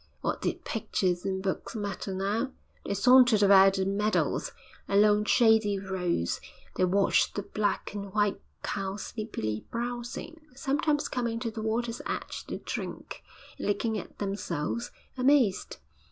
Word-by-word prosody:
What - - -2
did - - -2
pictures 185 -5 -1
and 190 -1 -2
books 190 +3 -3
matter 200 -2 -4
now? 205 +8 -1 0.3
They 200 - -2
sauntered 245 0 +6
about 195 -1 +7
the 190 -1 0
meadows, 205 +2 0 0.4
along 210 +1 +4
shady 220 -4 +4
roads; 180 - -1 0.3
they 185 - +3
watched 195 +2 +2
the 205 - -2
black 205 0 -2
and 200 -1 -6
white 205 -1 +1 0.2
cows 195 0 -3
sleepily 110 - -4
browsing, 240 +7 -5
sometimes 290 +2 0
coming 235 -2 -2
to 230 -2 -2
the 220 - -6
water's 230 +2 -1
edge - - -4
to - - -4
drink, - - -6 0.4
and - - -3
looking 210 +2 0
at - - -11
themselves, 195 0 -3 0.3
amazed. 255 -7 +3
210 Hz, 140 wpm, -29 LUFS, 195-235 Hz, 0.4 s, about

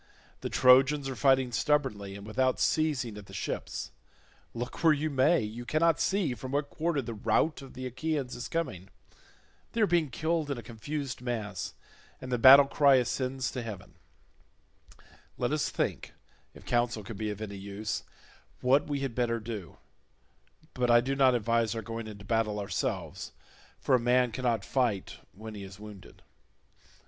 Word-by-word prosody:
The - - -4
Trojans 135 +3 +5
are 130 - -4
fighting 135 -2 +3
stubbornly 105 -6 0
and 100 0 -9
without 130 +4 0
ceasing 140 -9 0
at 100 - -13
the - - -11
ships; - - -4 0.6
look 120 +6 -6
where 160 -2 +7
you 155 +1 -1
may 135 +5 +3
you 110 +3 -5
cannot 155 +5 +2
see 190 -9 +1
from 130 +3 -7
what 145 0 -1
quarter 155 -3 -1
the 115 - -5
rout 115 +9 +1
of 135 - -12
the 130 - -6
Achaeans 135 0 -3
is 120 - -5
coming; 130 - -3 0.8
they 230 - 0
are - - +6
being 170 -5 +1
killed 160 +3 -1
in 140 - -2
a 120 - -7
confused 130 +5 -5
mass 110 -6 -4 0.4
and 130 - -8
the 125 - 0
battle 135 +3 +10
cry 140 0 +4
ascends 130 +1 -1
to 125 - -4
heaven; 105 -5 -8 1.4
let - - -1
us - - 0
think, - - -3 0.4
if - - -14
counsel 120 -2 0
can 110 +3 -8
be 110 +1 -3
of 105 -1 -5
any 110 -2 -5
use, 100 +2 -4 0.6
what 135 +3 +3
we 145 -2 -2
had 135 -3 -2
better 115 -1 0
do; 110 -5 -7 1.0
but 125 -1 0
I 120 0 +7
do 135 +3 -1
not 130 -2 +4
advise 115 -1 +1
our 115 - -4
going 115 -1 -5
into 100 -2 -10
battle 110 -1 0
ourselves, 100 -1 -3 0.5
for - - 0
a 130 - +6
man 125 +1 +3
cannot 120 -4 -1
fight 120 -8 -1 0.2
when 110 +3 -9
he 105 - -8
is 95 0 -11
wounded." 105 -3 -12
125 Hz, 170 wpm, -29 LUFS, 110-140 Hz, 1.4 s, battle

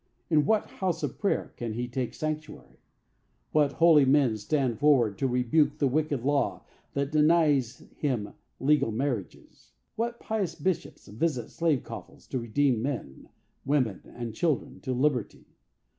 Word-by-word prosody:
In 150 -2 +4
what 220 -1 +3
house 180 -3 -3
of - - -3
prayer 200 - -1
can 115 -2 -4
he 120 +2 -3
take 125 0 -3
sanctuary? 155 0 -5 0.7
What 145 -2 +3
holy 165 -3 +6
men 135 -4 +4
stand 120 +1 -1
forward 130 -9 +4
to 135 - +1
rebuke 140 +4 +2
the 145 - +1
wicked 145 -2 0
law 140 +1 0 0.3
that 140 +1 -1
denies 150 -5 +3
him 125 -8 -2 0.3
legal 145 -4 +3
marriages? 120 -4 -4 0.2
What 235 +1 -2
pious 200 -7 -2
bishops 170 +2 -3
visit 125 +4 -2
slave 160 -6 +1
coffles - - -10
to 130 - -1
redeem 120 +1 +1
men, 120 - -5 0.3
women 130 -8 0
and 120 -2 -5
children, 155 +4 -1
to 130 - -4
liberty? 130 -3 0
140 Hz, 145 wpm, -28 LUFS, 120-155 Hz, 0.7 s, holy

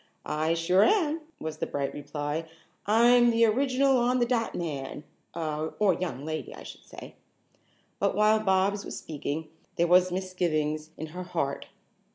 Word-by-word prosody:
"I 155 +2 0
sure 180 +4 +3
am," 330 -6 +2 0.2
was 155 0 -5
the - - -2
bright 140 -1 -3
reply. 145 +2 -4 0.4
"I'm 240 +3 +5
the 230 0 +4
original 265 +3 +2
on 245 +1 +2
the 240 - +2
dot 235 -2 -1
man, 145 -4 -4 0.3
or 160 +5 0
young 165 -5 -4
lady, 155 0 -5
I - - -11
should - - -11
say." - - -11 0.9
But - - +1
while 215 +1 +4
Bobs 200 0 +1
was - - -6
speaking 155 +1 -5 0.3
there 170 - +2
was 180 +1 +4
misgivings 160 -5 -1
in 160 - -5
her 180 - -5
heart. 170 -6 -3
180 Hz, 155 wpm, -28 LUFS, 155-225 Hz, 0.9 s, I'm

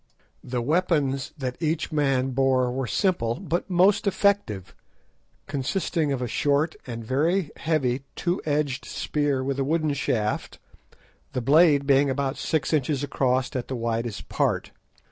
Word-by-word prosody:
The 125 -1 -3
weapons 145 -3 +1
that 130 0 -4
each 160 +1 -1
man 135 -3 +1
bore 130 -1 +2
were 130 0 -2
simple, 120 - +1
but 175 0 -3
most 190 +4 +3
effective, 190 - +1 0.7
consisting 150 +2 -1
of 130 -2 -1
a - - -1
short 145 +7 +1
and 115 -2 -6
very 155 - +1
heavy 140 -6 0
two 175 +1 -1
edged 145 -3 -1
spear 145 -3 -1
with 135 +1 -2
a - - +2
wooden 155 +1 +1
shaft, 110 -6 -1 0.8
the 125 - -1
blade 145 +2 +5
being 140 0 +4
about 135 +1 -1
six 155 -2 -1
inches 145 -1 +1
across 130 -1 0
at 125 - -2
the 130 - -3
widest 115 -2 -3
part. - - 0
140 Hz, 145 wpm, -25 LUFS, 130-155 Hz, 0.8 s, blade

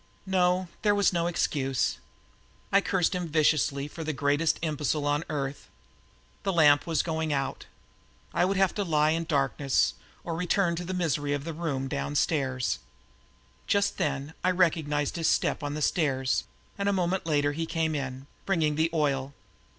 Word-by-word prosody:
No, 185 -1 +2
there 205 -1 +3
was 200 -2 +3
no 170 -1 +1
excuse. 135 -6 0 0.7
I 200 - +5
cursed 190 -2 +1
him 180 -2 -2
viciously 150 -2 +2
for 160 +2 -7
the 155 0 -2
greatest 145 +3 +1
imbecile 150 -1 -1
on 145 +2 +1
earth. 140 -2 -4 0.7
The 195 - 0
lamp 150 -3 +5
was 165 -2 +1
going 160 -2 -2
out. 135 -2 -2 0.7
I - - +2
would 190 +2 +1
have 195 -1 +3
to 205 - -1
lie 155 -3 +2
in 165 +1 -1
darkness 140 -3 +1 0.3
or 165 - -3
return 175 +1 +1
to 175 - -3
the 185 +2 -4
misery 145 -5 0
of 145 -1 -2
the 165 +1 -5
back 160 - -10
room 135 -5 -1
downstairs. 135 -2 0 0.9
Just 200 0 +1
then 140 +1 -2
I 185 - +3
recognized 160 -5 +1
his 165 - 0
step - - +1
on 145 0 -3
the 155 - -2
stairs 135 -6 +1 0.3
and 200 0 +1
a - - +2
moment 185 -1 0
later 145 -2 +2
he 165 +2 -3
came 160 -1 0
in, 135 -2 -4 0.2
bringing 160 -6 +1
the 160 +1 +2
oil. 140 -3 0
155 Hz, 170 wpm, -28 LUFS, 145-175 Hz, 0.9 s, I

